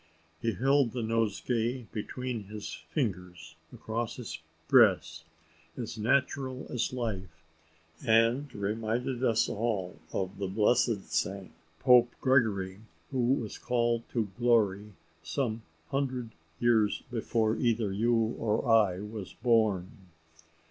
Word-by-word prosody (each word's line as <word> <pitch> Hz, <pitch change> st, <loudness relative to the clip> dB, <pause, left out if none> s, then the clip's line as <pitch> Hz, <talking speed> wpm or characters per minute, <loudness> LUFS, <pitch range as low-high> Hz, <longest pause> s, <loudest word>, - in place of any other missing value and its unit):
He 115 Hz, -1 st, 0 dB
held 135 Hz, +2 st, +2 dB
the 125 Hz, -2 st, -2 dB
nosegay 115 Hz, +2 st, 0 dB
between 120 Hz, 0 st, -4 dB
his 105 Hz, +1 st, -7 dB, 0.2 s
fingers, 90 Hz, -, -3 dB, 0.2 s
across 115 Hz, +1 st, -4 dB
his 125 Hz, -4 st, -7 dB, 0.3 s
breast, 80 Hz, +1 st, +4 dB, 0.5 s
as 120 Hz, -4 st, -5 dB
natural 130 Hz, +3 st, 0 dB
as 125 Hz, -1 st, -1 dB
life, 95 Hz, -10 st, -5 dB, 0.6 s
and 115 Hz, +4 st, +3 dB
reminded 115 Hz, +4 st, -2 dB
us 115 Hz, -3 st, +3 dB
all 105 Hz, -5 st, -2 dB
of 95 Hz, +1 st, -3 dB
the 100 Hz, -, -1 dB
blessed 105 Hz, +1 st, +1 dB
saint 95 Hz, 0 st, -1 dB, 0.3 s
Pope 125 Hz, -2 st, +5 dB
Gregory 105 Hz, -8 st, +2 dB, 0.3 s
who 130 Hz, -, -2 dB, 0.2 s
was 110 Hz, -6 st, -5 dB
called 120 Hz, -1 st, +1 dB
to 110 Hz, -4 st, -1 dB
glory 105 Hz, -4 st, +2 dB, 0.3 s
some 115 Hz, -, -2 dB, 0.3 s
hundred 130 Hz, -4 st, -2 dB, 0.3 s
years 110 Hz, -4 st, +2 dB
before 115 Hz, -1 st, 0 dB
either 115 Hz, -4 st, +1 dB
you 115 Hz, +2 st, +1 dB
or 110 Hz, -1 st, 0 dB
I 105 Hz, -5 st, +4 dB
was 105 Hz, -2 st, -7 dB
born. 110 Hz, -6 st, +2 dB
115 Hz, 115 wpm, -30 LUFS, 100-120 Hz, 0.6 s, Pope